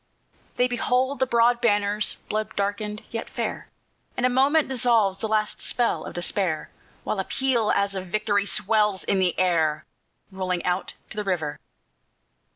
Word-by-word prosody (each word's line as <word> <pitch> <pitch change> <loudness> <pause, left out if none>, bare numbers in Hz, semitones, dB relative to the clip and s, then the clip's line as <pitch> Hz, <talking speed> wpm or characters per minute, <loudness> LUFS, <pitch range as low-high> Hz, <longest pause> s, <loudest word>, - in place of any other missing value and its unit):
They 250 - +3
behold 250 +2 0
the 260 - +2
broad 235 0 +3
banners, 205 -2 +2
blood 215 0 -3
darkened, 205 +1 -2
yet 230 0 -4
fair, - - -4 0.5
And 250 - +1
a - - +4
moment 275 +5 +3
dissolves 230 -6 +2
the 220 - -1
last 215 -1 0
spell 240 -1 0
of - - -8
despair, 175 -3 -1 0.3
While 210 - -2
a - - +1
peal, 240 -2 +1
as 200 0 +1
of 190 -1 -4
victory, 205 +1 +1
swells 210 -2 +1
on 195 - +2
the 185 -2 +2
air, 160 -4 +1 0.5
Rolling 185 -2 -2
out 180 +1 -1 0.2
to - - -6
the 210 - -1
river. 160 -7 -2
210 Hz, 160 wpm, -25 LUFS, 190-235 Hz, 0.5 s, a